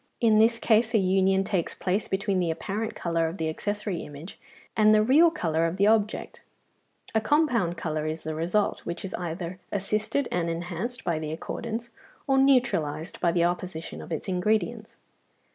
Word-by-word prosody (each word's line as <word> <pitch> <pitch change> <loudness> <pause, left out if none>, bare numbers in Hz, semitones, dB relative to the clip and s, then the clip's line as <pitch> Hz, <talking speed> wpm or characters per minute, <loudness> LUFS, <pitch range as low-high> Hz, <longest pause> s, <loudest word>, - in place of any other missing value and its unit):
In 220 -2 +4
this 230 +1 +4
case 225 0 +2
a - - +7
union 190 0 +3
takes 190 -4 -1
place 195 +3 -1
between 195 0 0
the 175 -2 0
apparent 205 +7 -3
colour 165 -1 0
of 165 +4 -5
the 160 - -1
accessory 205 +3 -3
image 150 +5 -10 0.4
and 215 0 +5
the 215 - +4
real 295 +9 +6
colour 165 - 0
of 165 +3 -4
the 200 - +3
object; 215 -1 +1 0.7
a 220 - +2
compound 235 - +2
colour 155 -2 -2
is 155 +1 -4
the 160 - -3
result, 175 +7 0
which 170 +3 -6
is 190 - -5
either 175 +1 -5
assisted 215 +6 -1
and 170 -1 0
enhanced 175 +8 -4
by 165 -2 0
the 155 -1 -4
accordance, 230 +8 -5 0.3
or 270 -1 +3
neutralised 215 - +2
by 170 - +3
the 170 0 +2
opposition 175 -1 -3
of - - -11
its 160 - -3
ingredients. 215 +4 -1
190 Hz, 175 wpm, -27 LUFS, 170-220 Hz, 0.7 s, a